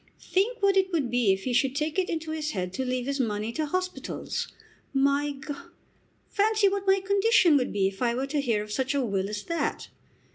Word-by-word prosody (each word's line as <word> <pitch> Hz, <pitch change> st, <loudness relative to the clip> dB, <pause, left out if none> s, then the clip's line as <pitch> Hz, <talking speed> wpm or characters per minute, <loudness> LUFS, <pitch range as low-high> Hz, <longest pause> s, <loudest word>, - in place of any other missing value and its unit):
Think 415 Hz, +4 st, 0 dB
what 395 Hz, -1 st, +4 dB
it 380 Hz, 0 st, +2 dB
would 290 Hz, -9 st, 0 dB
be 240 Hz, -5 st, +3 dB
if 190 Hz, 0 st, -1 dB
he 255 Hz, -, -1 dB
should 265 Hz, +2 st, +2 dB
take 305 Hz, +4 st, -1 dB
it 370 Hz, -, 0 dB
into 320 Hz, -1 st, -3 dB
his 305 Hz, -1 st, -3 dB
head 180 Hz, -2 st, -3 dB
to 265 Hz, -, -2 dB
leave 250 Hz, -1 st, -2 dB
his 280 Hz, +1 st, -2 dB
money 215 Hz, -2 st, -1 dB
to 310 Hz, +5 st, -2 dB
hospitals. 365 Hz, +3 st, -3 dB, 0.5 s
My 280 Hz, +2 st, +2 dB, 0.2 s
G; 290 Hz, -, -3 dB, 0.7 s
fancy 430 Hz, 0 st, +3 dB
what 395 Hz, 0 st, -1 dB
my 385 Hz, 0 st, +4 dB
condition 400 Hz, -4 st, +4 dB
would 255 Hz, -, -1 dB
be 195 Hz, -1 st, +2 dB
if 195 Hz, +3 st, -7 dB
I 235 Hz, -1 st, +2 dB
were 260 Hz, +2 st, -1 dB
to 285 Hz, +1 st, -1 dB
hear 230 Hz, -6 st, 0 dB
of 210 Hz, -, -10 dB
such 265 Hz, +5 st, -1 dB
a 275 Hz, -3 st, +1 dB
will 195 Hz, -2 st, -1 dB
as 210 Hz, -1 st, -4 dB
that! 335 Hz, -1 st, -2 dB
280 Hz, 220 wpm, -27 LUFS, 235-370 Hz, 0.7 s, what